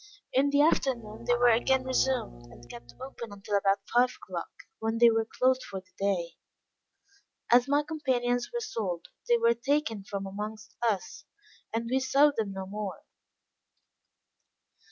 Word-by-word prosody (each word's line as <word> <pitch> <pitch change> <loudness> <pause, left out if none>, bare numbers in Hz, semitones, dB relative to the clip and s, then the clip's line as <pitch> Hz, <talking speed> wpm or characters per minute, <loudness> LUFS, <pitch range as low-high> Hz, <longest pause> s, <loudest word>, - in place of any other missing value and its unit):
In 275 +2 +3
the 285 +1 +4
afternoon 235 -7 0
they 245 - +4
were 240 0 +5
again 260 +3 +2
resumed, 255 - -1
and 120 0 -15
kept 120 0 -12
open 250 -4 -8
until 205 +1 -4
about 195 0 +1
five 245 +1 +5
o'clock, - - -6 0.3
when 225 +1 -1
they 235 0 +7
were 225 0 0
closed 260 0 +2
for 195 -1 -6
the 185 0 -22
day. 185 -4 -1 1.1
As 245 +1 +6
my 290 +1 +2
companions 250 -6 -1
were 475 - -3
sold, 200 - -4 0.2
they 240 - +6
were 230 0 +4
taken 235 -3 -1
from 200 0 -5
amongst 215 +2 -7
us, 220 -6 -1 0.5
and 230 +1 -2
we 260 +3 +1
saw 275 +3 +4
them 215 -3 -1
no 190 0 -5
more. 205 0 -6
230 Hz, 155 wpm, -29 LUFS, 200-260 Hz, 1.1 s, they